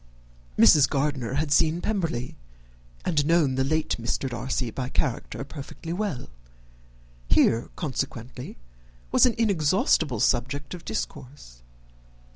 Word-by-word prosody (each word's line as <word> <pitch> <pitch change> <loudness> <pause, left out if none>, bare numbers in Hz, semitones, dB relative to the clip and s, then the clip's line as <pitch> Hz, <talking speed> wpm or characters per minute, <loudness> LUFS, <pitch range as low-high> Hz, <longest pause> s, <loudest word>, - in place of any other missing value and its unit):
Mrs. 145 -4 +7
Gardiner 135 -3 -1
had 150 0 -1
seen 160 +2 +3
Pemberley, 165 - -2 0.7
and 155 -5 +2
known 160 -3 +3
the 130 0 +1
late 155 +3 0
Mr. 120 +3 -2
Darcy 125 0 -2
by 125 +2 -4
character 135 0 -2
perfectly 150 +3 -7
well. 185 -9 -3 1.0
Here, 115 +1 +3
consequently, 130 -5 -5 0.5
was - - +6
an 240 - 0
inexhaustible 160 - +2
subject 135 +5 0
of 180 - -9
discourse. 110 - -6
140 Hz, 110 wpm, -26 LUFS, 125-160 Hz, 1.0 s, Mrs